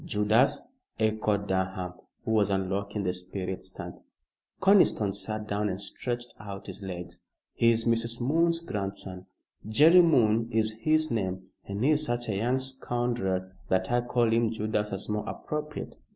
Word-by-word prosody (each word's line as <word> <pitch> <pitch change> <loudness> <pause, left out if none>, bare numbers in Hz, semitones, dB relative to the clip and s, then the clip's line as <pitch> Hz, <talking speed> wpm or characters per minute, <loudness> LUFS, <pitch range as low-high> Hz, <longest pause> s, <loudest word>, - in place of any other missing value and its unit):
"Judas?" 105 - +2 0.3
echoed 110 -2 +1
Durham, 95 -1 -1 0.3
who - - -1
was 105 -2 +3
unlocking 100 +1 -1
the 90 -1 0
spirit 90 +1 -5
stand. - - -8 0.6
Conniston 185 - +4
sat 105 +1 -5
down 105 +1 0
and 95 0 -3
stretched 120 +4 -4
out 100 -1 -8
his 105 - -8
legs. 90 -2 -6 0.3
"He's 115 -1 +3
Mrs. 115 0 +1
Moon's 165 +6 +2
grandson. 95 - -5 0.4
Jerry 160 +10 +7
Moon 115 -8 +3
is 110 -1 +1
his 155 +3 +2
name 95 -4 -2 0.2
but 100 - -4
he's 150 +2 +3
such 120 -4 -2
a 105 - 0
young 120 +6 +1
scoundrel 120 -8 -2 0.2
that 95 +3 +1
I 120 0 +3
call 120 -2 +1
him 115 0 +3
Judas 105 -1 -1
as 95 - -5
more 105 0 -2
appropriate. 150 0 -5
110 Hz, 150 wpm, -28 LUFS, 95-120 Hz, 0.6 s, Jerry